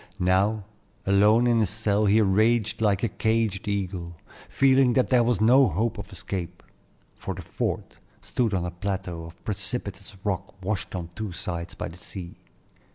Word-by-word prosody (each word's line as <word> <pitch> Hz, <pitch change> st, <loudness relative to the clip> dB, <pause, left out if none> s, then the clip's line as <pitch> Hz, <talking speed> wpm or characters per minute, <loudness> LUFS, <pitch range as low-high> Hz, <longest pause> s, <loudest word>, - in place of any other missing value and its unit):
Now, 95 Hz, +3 st, +2 dB, 0.4 s
alone 105 Hz, +4 st, +5 dB
in 120 Hz, -1 st, +3 dB
his 105 Hz, -5 st, +2 dB
cell, 105 Hz, 0 st, +1 dB
he 105 Hz, +3 st, +5 dB
raged 110 Hz, +3 st, +2 dB
like 100 Hz, -2 st, +2 dB
a -, -, +3 dB
caged 110 Hz, -3 st, 0 dB
eagle, 95 Hz, -4 st, -3 dB, 0.3 s
feeling 135 Hz, -2 st, +4 dB
that 130 Hz, 0 st, +2 dB
there 125 Hz, -2 st, +5 dB
was 120 Hz, -4 st, +1 dB
no 125 Hz, +4 st, +6 dB
hope 110 Hz, +6 st, -1 dB
of 100 Hz, 0 st, -8 dB
escape; 90 Hz, -2 st, -5 dB, 0.5 s
for -, -, -6 dB
the -, -, -8 dB
fort -, -, -4 dB, 0.2 s
stood 115 Hz, -5 st, -1 dB
on 90 Hz, -2 st, -1 dB
a 90 Hz, -, -3 dB
plateau 90 Hz, -2 st, -4 dB
of 85 Hz, +1 st, -14 dB
precipitous 100 Hz, -2 st, -4 dB
rock 100 Hz, -2 st, -3 dB
washed 100 Hz, -2 st, -2 dB
on 85 Hz, -2 st, -4 dB
two 105 Hz, +3 st, -5 dB
sides 85 Hz, -2 st, -5 dB
by -, -, -4 dB
the 85 Hz, +1 st, -10 dB
sea. 90 Hz, -1 st, -8 dB
100 Hz, 165 wpm, -26 LUFS, 90-110 Hz, 0.5 s, no